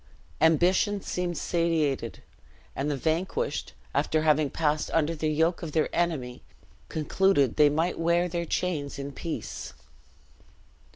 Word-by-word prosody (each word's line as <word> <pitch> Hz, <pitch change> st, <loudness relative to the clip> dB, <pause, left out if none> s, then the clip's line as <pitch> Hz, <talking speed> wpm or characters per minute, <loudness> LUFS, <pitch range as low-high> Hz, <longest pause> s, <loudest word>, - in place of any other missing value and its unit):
Ambition 180 Hz, +6 st, +3 dB
seemed 180 Hz, -3 st, -3 dB
satiated; 165 Hz, -4 st, 0 dB, 0.5 s
and 140 Hz, +2 st, -1 dB
the 145 Hz, -, -1 dB
vanquished, 175 Hz, -, -1 dB, 0.2 s
after 155 Hz, 0 st, +1 dB
having 155 Hz, -2 st, +3 dB
passed 150 Hz, +1 st, 0 dB
under 165 Hz, 0 st, +2 dB
the 155 Hz, -1 st, -2 dB
yoke 160 Hz, +3 st, +1 dB
of 160 Hz, -4 st, -6 dB
their 155 Hz, -, 0 dB
enemy, 150 Hz, -8 st, -1 dB, 0.5 s
concluded 155 Hz, -3 st, +2 dB
they 150 Hz, -1 st, +6 dB
might 160 Hz, +5 st, 0 dB
wear 170 Hz, +1 st, +2 dB
their 170 Hz, 0 st, -2 dB
chains 155 Hz, -6 st, -2 dB
in 140 Hz, 0 st, -5 dB
peace. 160 Hz, -, -6 dB
160 Hz, 125 wpm, -27 LUFS, 150-175 Hz, 0.5 s, they